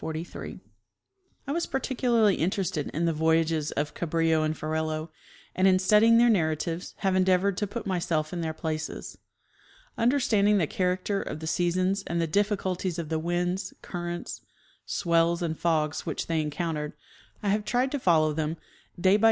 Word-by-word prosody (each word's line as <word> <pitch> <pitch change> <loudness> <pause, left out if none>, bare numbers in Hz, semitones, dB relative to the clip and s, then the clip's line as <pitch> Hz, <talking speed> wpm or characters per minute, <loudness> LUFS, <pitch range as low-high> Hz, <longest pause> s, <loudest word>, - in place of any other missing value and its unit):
I - - -2
was 335 +3 -1
particularly 240 -5 +2
interested 175 -4 -1
in 165 +3 -2
the 165 - +1
voyages 160 -1 +1
of 145 +1 -2
Cabrillo 165 -1 +1
and 155 0 -1
Ferrelo, 155 +1 -2 0.5
and 185 +1 +4
in 185 -1 +5
studying 210 +4 +5
their 240 +1 +6
narratives 165 -3 0
have 190 -1 0
endeavored 185 +1 +3
to 205 - -1
put 225 +2 -6
myself 170 -5 -1
in 175 - -3
their 160 -1 -1
places. 155 0 -5 0.8
Understanding 225 -5 +3
the 175 - +2
character 185 +4 -1
of 155 - -5
the 160 - -6
sea 175 +2 +1
sons 185 +3 0
and 170 - -1
the 165 - +2
difficulties 190 -1 0
of 165 -3 -4
the 160 -1 0
winds, 175 +3 -2
currents, 175 -1 -5 0.5
swell 170 -2 +2
and 160 -1 -1
fogs 155 -3 0
which - - -3
they 165 -1 0
encountered, 150 0 -3 0.5
I 205 - +1
have 210 +1 +1
tried 250 +4 0
to 285 - -1
follow 155 -7 +3
them 160 +1 -2 0.4
day 190 +3 +5
by - - -5
175 Hz, 160 wpm, -27 LUFS, 160-200 Hz, 0.8 s, their